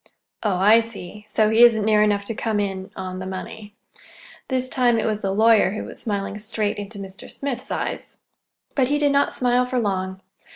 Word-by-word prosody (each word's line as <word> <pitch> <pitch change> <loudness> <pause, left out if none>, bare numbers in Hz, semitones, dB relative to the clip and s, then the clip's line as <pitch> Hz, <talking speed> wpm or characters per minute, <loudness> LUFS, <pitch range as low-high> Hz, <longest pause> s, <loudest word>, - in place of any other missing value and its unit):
"Oh 205 -4 0
I 210 +5 +6
see. 210 -3 -8
So 215 0 +2
he 225 +1 +4
isn't 225 -3 +6
near 215 -1 +4
enough 205 -1 +2
to 225 - -3
come 215 -1 -1
in—on 190 -1 -4
the 185 - -5
money." 205 +2 -8 0.7
This 255 -1 -1
time 245 -2 +2
it 225 - 0
was 215 -1 -1
the 195 - -1
lawyer 220 -1 +4
who 215 - -4
was - - -9
smiling 200 -1 -3
straight 215 -1 -2
into 205 +1 -7
Mr. 195 -1 -9
Smith's 270 -3 -5
eyes. - - -4 0.6
But 265 -3 +2
he 290 +2 +1
did 290 -1 +2
not 280 0 +2
smile 250 0 +1
for 255 0 -2
long. 190 -4 -1
215 Hz, 195 wpm, -22 LUFS, 200-235 Hz, 0.7 s, I